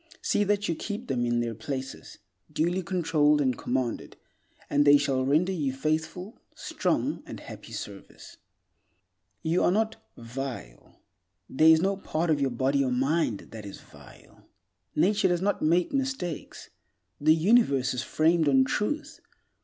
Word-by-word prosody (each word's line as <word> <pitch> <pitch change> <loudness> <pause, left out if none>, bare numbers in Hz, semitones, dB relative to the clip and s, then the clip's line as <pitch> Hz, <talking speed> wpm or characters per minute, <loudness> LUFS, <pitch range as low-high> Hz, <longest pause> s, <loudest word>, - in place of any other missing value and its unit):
See 205 - +2
that 205 0 0
you 170 - 0
keep 210 +8 -5
them 120 -1 0
in 120 0 +1
their 115 -1 -2
places, 130 +4 -6 0.3
duly 175 +5 0
controlled 160 -5 +2
and 130 -3 +1
commanded, 125 -1 -3 0.5
and 145 0 +2
they 145 0 +7
shall 135 -2 0
render 155 +8 +2
you 145 -8 -1
faithful, 160 - -3 0.2
strong, - - -1
and - - -8
happy - - -11
service. - - -9 1.1
You 165 +2 +1
are - - +4
not 220 +4 0 0.2
"vile." 115 - -8 0.4
There 155 +4 +4
is 160 0 +6
no 195 0 +1
part 165 -3 -1
of 145 -2 +1
your 135 - +2
body 135 +3 +1
or 130 - -1
mind 130 -3 0
that 110 -2 -8
is 100 -1 -9
vile. - - -18 0.5
Nature 200 +5 +3
does 175 -1 +1
not 205 +1 0
make 170 - +2
mistakes. 265 - -4 0.5
The 155 +2 +5
Universe 155 - +3
is 125 - -2
framed 160 -1 +2
on 135 -1 +5
Truth. 290 - -3
155 Hz, 150 wpm, -27 LUFS, 130-180 Hz, 1.1 s, they